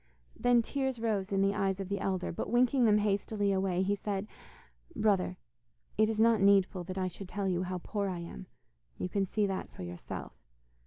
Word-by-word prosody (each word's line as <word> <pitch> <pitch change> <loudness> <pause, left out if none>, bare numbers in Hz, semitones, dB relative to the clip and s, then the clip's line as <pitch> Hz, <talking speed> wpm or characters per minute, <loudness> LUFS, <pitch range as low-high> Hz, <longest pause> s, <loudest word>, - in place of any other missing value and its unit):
Then 245 -1 +3
tears 265 -1 -2
rose 210 -4 -1
in 195 0 +2
the 195 0 +2
eyes 195 -2 0
of 195 - -4
the 200 +1 -2
elder, 190 -2 -1
but - - -4
winking 245 +1 +3
them 210 -2 +5
hastily 205 0 0
away, 190 -1 +1
he 200 +2 +1
said: 200 0 -3 0.7
'Brother, 200 - +1 0.6
it 215 +1 +3
is 220 -1 -2
not 225 -1 +5
needful 195 -2 +4
that 185 +1 -6
I 185 -1 0
should 185 +1 -8
tell 200 0 -2
you 180 -1 +1
how 185 0 -3
poor 200 +3 -2
I 180 - -3
am; 170 - -8 0.5
you - - -2
can 195 0 0
see 210 +2 +1
that 195 -1 -3
for - - -9
yourself. 90 0 -7
195 Hz, 200 wpm, -31 LUFS, 185-215 Hz, 0.7 s, them